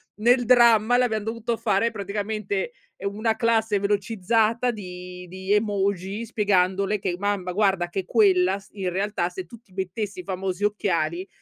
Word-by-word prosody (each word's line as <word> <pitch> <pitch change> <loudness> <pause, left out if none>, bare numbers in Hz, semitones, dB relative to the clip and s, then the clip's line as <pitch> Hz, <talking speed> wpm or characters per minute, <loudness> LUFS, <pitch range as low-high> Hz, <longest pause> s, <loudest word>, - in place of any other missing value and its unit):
nel 245 +3 +3
dramma 235 -1 +5
le 250 - +4
abbiam 220 -3 -1
dovuto 230 +1 -3
fare 210 +2 +1
praticamente, 215 - -3 0.3
ehm, 200 0 -4
una 220 +1 0
classe 225 -3 +1
velocizzata 215 +3 +1
di 180 -3 -9
di 190 +2 -2
emoji 200 0 0
spiegandole 200 -1 +1
che: 185 -2 -2
"Mamma 200 -2 -1
guarda 195 -3 +2
che 190 +2 -3
quella 190 -3 +3
s 195 - -20
in 190 -3 -2
realtà 190 -1 -1
se 180 0 -7
tu 230 +6 -13
ti 210 - -31
mettessi 190 +1 -4
i - - -17
famosi 190 0 -3
occhiali 185 -4 -1
205 Hz, 160 wpm, -24 LUFS, 185-220 Hz, 0.3 s, dramma